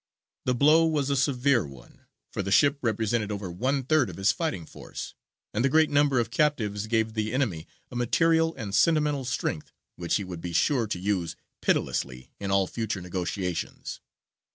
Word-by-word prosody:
The 125 - +2
blow 150 +6 +5
was 145 -3 0
a - - +2
severe 130 -3 +2
one, 65 -5 -14 0.2
for - - -2
the 100 - -4
ship 140 +6 +4
represented 110 -1 0
over 100 -3 -4
one 130 +9 0
third 145 -1 +2
of - - -9
his 95 +1 +3
fighting 105 - -3
force, - - -8 0.4
and 110 - 0
the 135 - +3
great 155 +2 +4
number 145 -3 +3
of 115 -1 -1
captives 110 -9 0
gave 110 -1 +1
the 110 -1 -1
enemy 110 - -1 0.2
a - - -9
material 165 +7 +2
and 105 -6 -6
sentimental 150 -1 +2
strength 120 -10 -3 0.3
which 85 -1 -1
he 100 - 0
would 90 -3 -7
be 85 0 -5
sure 120 - +2
to 105 - -2
use 90 -3 -1 0.3
pitilessly 65 -2 -1
in 100 - -4
all 95 0 +3
future 110 0 -3
negotiations. 90 0 -4
115 Hz, 175 wpm, -27 LUFS, 95-140 Hz, 0.4 s, blow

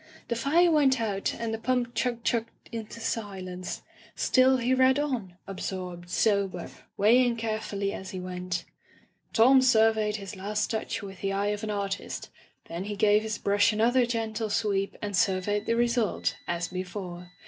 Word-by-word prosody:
The 235 - 0
fire 320 +9 +3
went 275 -5 +4
out 205 -3 -1
and 230 -1 -3
the 225 - -3
pump 245 0 0
chug 240 -2 -1
chugged 230 -2 -2
into 230 -1 -6
silence; 190 -5 -4 0.3
still 260 0 +4
he 250 +1 +1
read 260 +1 +4
on, 245 -12 -2
absorbed, 180 -2 -5
sober, 195 -4 +1 0.3
weighing 240 +4 +4
carefully 215 -3 -2
as 190 -3 -7
he 185 - -5
went 180 -1 -4 0.7
Tom 260 +4 +6
surveyed 220 -4 +3
his 200 -1 -6
last 205 +2 -2
touch 220 -1 -3
with 195 -2 -9
the 195 - -1
eye 200 +1 0
of 210 +1 -3
an 215 - -3
artist^ 200 -1 -3 0.4
then 170 +3 -5
he 205 0 -4
gave 210 +1 +4
his 215 -1 -3
brush 205 +2 +3
another 235 +3 +3
gentle 225 -2 -2
sweep 205 -2 0
and 205 -1 -2
surveyed 205 +2 +1
the 230 - +2
result^ 235 -2 +1
as 170 0 -2
be^ 185 0 -3
fore. 180 -2 -7
210 Hz, 165 wpm, -28 LUFS, 195-235 Hz, 0.7 s, Tom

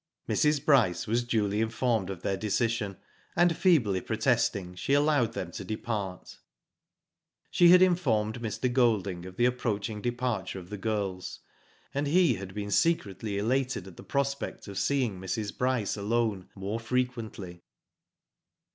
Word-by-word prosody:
'* - - -48
Mrs. 150 -1 +2
Bryce 120 - +3
was 115 +2 +1
duly 105 -3 0
informed 115 -3 0
of 95 -3 -6
their 95 - 0
decision, 105 0 -1 0.4
and 175 -1 +4
feebly 120 - +3
protesting, 110 -5 0
she 90 +9 -2
allowed 145 -5 +3
them 90 -5 -4
to 95 - -6
depart. 100 -2 -5 1.1
She 175 - +6
had 180 +1 +8
informed 120 -11 +1
Mr. 120 +2 -2
Golding 100 -8 +1
of 90 - -10
the 120 - +3
approach 115 -4 -1
ing 105 -1 -6
departure 120 -6 -2
of 90 0 -10
the 105 - -4
girls, 100 -3 -3 0.5
and 145 +1 -1
he 170 -2 +4
had 95 -2 -7
been 105 0 -4
secretly 105 - +1
elated 125 0 0
at 95 -3 -12
the - - -11
prospect 140 -3 -2
of 100 -1 -4
seeing 125 -9 0
Mrs. 95 +2 -3
Bryce 125 -5 0
alone, 105 -2 -1
more 100 +3 -3
frequently. 115 -7 -3
110 Hz, 145 wpm, -29 LUFS, 100-125 Hz, 1.1 s, had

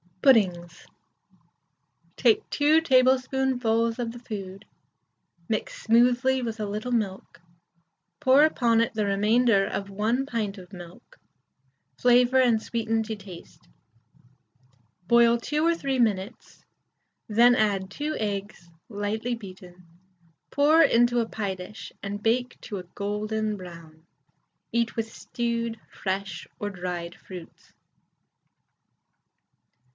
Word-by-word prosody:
PUDDINGS. 180 -9 +2 1.3
Take 435 -1 +2
2 305 +2 +4
tablespoonfuls 255 -4 +2
of 235 -2 -3
the 240 - -10
food, 200 -4 -8 0.8
mix 215 -2 -3
smoothly 245 +3 +3
with 225 -1 -4
a 210 - -2
little 215 +4 -4
milk, 205 -8 -3 0.8
pour 265 +3 +5
upon 235 -7 +3
it 230 - -1
the 215 -2 -1
remainder 210 +1 +3
of 200 0 -4
1 225 +7 -1
pint 215 -6 -3
of 180 +1 -14
milk, 175 -1 -13 0.8
flavour 245 +1 +4
and 235 -4 +3
sweeten 225 -1 -1
to 220 0 -5
taste; 190 -4 -13 1.4
boil 235 +1 +5
2 300 +6 -1
or 335 0 +3
3 275 -5 -2
minutes, 210 -2 -2 0.6
then 235 +3 +5
add 200 -4 0
2 300 +9 -4
eggs 200 -4 -4 0.2
lightly 220 +3 -2
beaten, 185 -4 -13 0.7
pour 300 +3 +4
into 240 -3 +3
a 225 -1 -1
pie 200 -3 -3
dish, 200 +3 -10
and 200 +1 -5
bake 245 +2 0
to 210 - -6
a 185 - -6
golden 210 +1 -2
brown. 165 -3 -12 0.7
Eat 235 0 0
with 225 -1 -3
stewed, 235 -1 -3
fresh, 190 -2 -4
or 205 - -3
dried 175 -2 -5
fruits. 180 -3 -12
225 Hz, 115 wpm, -26 LUFS, 200-245 Hz, 1.4 s, pour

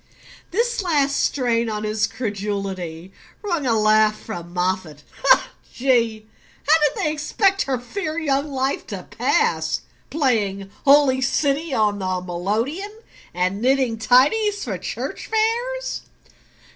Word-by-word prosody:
This 470 +4 0
last 290 -6 +1
strain 235 -5 +1
on 210 0 -3
his 215 +1 0
credulity 195 -5 -4 0.3
wrung 340 -9 -1
a 230 -2 +3
laugh 215 0 +4
from 175 -5 -7
Moffatt. 180 -4 -2 0.7
"Gee! 230 -4 +1 0.4
How'd 300 -1 +4
they 305 - +1
expect 390 +6 +1
her 265 -2 0
fair 310 +5 -4
young 285 -3 0
life 265 0 -1
to - - -6
pass? - - 0 0.3
Playing 205 -10 0
'Holy 275 -2 +5
City' 280 +3 0
on 210 -2 +1
the 185 -1 -1
melodeon, 220 - -3 0.3
and 185 +3 -1
knitting 255 -3 +2
tidies 395 - +3
for - - -4
church - - -5
fairs?" 480 +3 -1
250 Hz, 120 wpm, -22 LUFS, 205-305 Hz, 0.7 s, Holy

